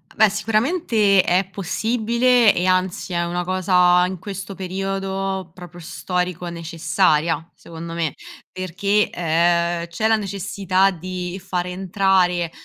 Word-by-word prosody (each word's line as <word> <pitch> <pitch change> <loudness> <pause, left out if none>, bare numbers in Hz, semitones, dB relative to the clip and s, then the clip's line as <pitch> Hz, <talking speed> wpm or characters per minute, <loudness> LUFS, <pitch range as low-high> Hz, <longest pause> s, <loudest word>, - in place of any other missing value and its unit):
Beh, 220 -1 +5
sicuramente 215 - +2
è 180 +2 +1
possibile 230 +4 +2
e 180 - 0
anzi, 185 0 0
è 170 0 0
una 175 +1 -2
cosa 180 -1 +3
in 190 0 -5
questo 195 +1 -7
periodo, 195 0 -3
proprio 175 -1 -12
storico, 180 +1 -3
necessaria 165 -1 0
secondo 165 0 -9
me, 165 -3 -2 0.4
perché, 200 +3 0
ehm, 170 0 +1
c'è 170 +6 -1
la 225 - +4
necessità 195 -1 0
di 180 +1 -6
far 180 -2 -2
entrare 180 -2 +1
185 Hz, 120 wpm, -21 LUFS, 175-195 Hz, 0.4 s, Beh